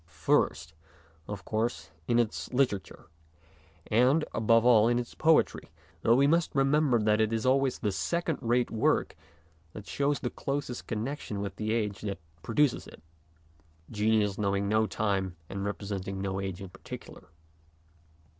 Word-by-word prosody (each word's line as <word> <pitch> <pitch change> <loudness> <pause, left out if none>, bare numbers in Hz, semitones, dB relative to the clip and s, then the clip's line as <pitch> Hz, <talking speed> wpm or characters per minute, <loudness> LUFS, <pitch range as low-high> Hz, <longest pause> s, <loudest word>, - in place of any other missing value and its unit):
First, 80 -1 0 0.5
of 100 -3 -7
course, 110 -7 -2 0.2
in 120 - +2
its 115 -3 -1
literature, 125 -8 -1 0.8
and, 130 +8 +3
above 115 +1 +3
all, 115 -3 +6
in 120 0 +2
its 120 -1 -4
poetry, 160 0 +2 0.3
though 115 - +4
we 135 +2 +4
must 165 +2 +2
remember 135 -1 +3
that 105 0 +2
it 110 0 +1
is 115 0 -1
always 135 0 +2
the 105 - -1
second 165 - -1
rate 120 +1 +1
work 110 - +1 0.6
that 105 - -9
shows 145 0 0
the 120 - -3
closest 140 -3 -4
connection 115 -1 -4
with 100 -1 -5
the 110 0 -2
age 105 -3 -1
that 100 -2 -3 0.2
pro 115 - -6
duces 150 -4 +2
it, - - -14 0.9
genius 105 -2 +1
knowing 100 -1 0
no 110 +1 +2
time 95 -5 -1
and 100 - -6
repre 100 0 -5
senting 95 +1 -6
no 95 0 -3
age 95 0 -5
in 95 - -7
particular. - - -11
110 Hz, 155 wpm, -29 LUFS, 100-125 Hz, 0.9 s, all